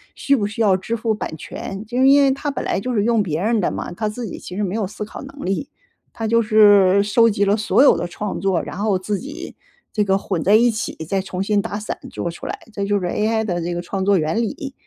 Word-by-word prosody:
需 280 - +2
不 210 -6 0
需 210 +2 -5
要 200 -4 +4
支 225 +5 -3
付 220 0 0
版 185 -6 -5
权。 195 +6 -7
就 245 +4 0
因 275 +2 +7
为 275 - +4
它 280 +2 -2
本 280 - -4
来 - - 0
就 250 +6 -3
是 210 -3 +1
用 230 0 +2
别 160 -6 -2
人 220 +4 +1
的 - - 0
嘛， - - -5
它 215 +4 -2
自 235 +3 -5
己 210 - -7
其 180 - -9
实 210 - -1
没 190 -2 -2
有 215 -3 -1
思 210 +2 -6
考 - - -9
能 275 +1 -9
力， 195 +9 -2 0.4
它 225 - -4
就 230 +1 +3
是 205 -3 +5
收 230 +3 +4
集 205 -1 +1
了 200 +1 +3
所 215 +5 +3
有 285 - +6
的 175 - -3
创 205 +3 -5
作， 190 -3 +1
然 - - -7
后 205 -2 +1
自 195 +2 -3
己 290 +2 -8 0.4
这 210 - +2
个 195 -1 +2
混 185 -4 -3
在 205 - +5
一 235 +2 +5
起， 215 - -4
再 195 +2 0
重 185 0 -4
新 205 0 +1
打 210 -1 -4
散 215 - -4
做 170 - -4
出 170 - -8
来。 - - -4 0.2
这 200 - -3
就 205 0 +1
是 180 - -4
AI 220 +5 0
的 175 -4 -2
这 175 +1 -3
个 175 - -2
创 190 +2 -3
作 200 0 +3
原 160 +6 0
理， 275 - -4
210 Hz, 295 characters per minute, -20 LUFS, 190-225 Hz, 0.4 s, 因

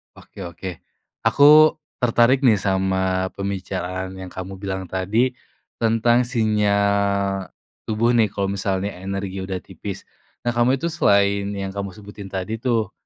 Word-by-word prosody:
Oke - - -16
oke. 85 +2 -7 0.6
Aku 150 +2 +7 0.2
tertarik 125 +1 +4
nih 115 -4 +6
sama 95 -1 0
pembicaraan 95 -1 -4
yang 95 -1 -8
kamu 95 +1 -7
bilang 95 -1 -3
tadi 105 +8 0 0.5
tentang 115 +2 +3
sinyal 100 -4 +1 0.4
tubuh 115 +2 +2
nih, 110 -3 +4
kalau 100 -1 -1
misalnya 100 0 -2
energi 95 0 -4
udah 95 -1 -4
tipis. 95 +2 -8 0.4
Nah 120 - +2
kamu 120 +3 +3
itu 170 - -1
selain 100 -9 +2
yang 95 -1 -4
kamu 100 -1 -3
sebutin 100 -1 -10
tadi 95 +3 -3
tuh, 115 -4 0
100 Hz, 135 wpm, -22 LUFS, 95-115 Hz, 0.6 s, Aku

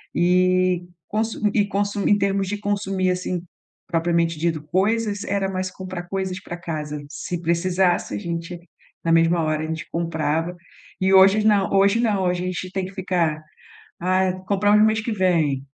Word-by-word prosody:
eh, 185 0 +3 0.3
consu 220 +1 -2
e 205 -2 +2
consu 200 0 -1
em 205 - +5
termos 195 -1 0
de 205 +2 -2
consumir 195 -2 0
assim, 180 -1 -3 0.4
propriamente 170 -1 +1
dito, 160 -2 -1
coisas 205 +4 0
era 195 -1 0
mais 185 0 -2
comprar 185 -2 -7
coisas 190 -1 -3
para 175 - -7
casa 150 -3 -5
se 170 +3 -5
precisasse 175 +2 +1
a - - -2
gente 170 -1 -5 0.5
na 165 - +1
mesma 165 +1 +4
hora 155 0 -1
a - - -3
gente 160 0 -5
comprava, 165 0 -1 0.5
e 190 +1 +2
hojes 195 +3 +6
não 205 -3 +3
hoje 200 +3 +4
não, 210 -5 +1
hoje 180 0 0
a - - -3
gente 185 0 -4
tem 190 -1 -2
que 190 - -9
ficar: 175 -5 -1 0.6
"Ah, 185 +1 +2
compramos 205 +1 +4
mês 220 0 +2
que 225 0 -3
vem.". 165 -9 +1
185 Hz, 165 wpm, -22 LUFS, 170-195 Hz, 0.6 s, hojes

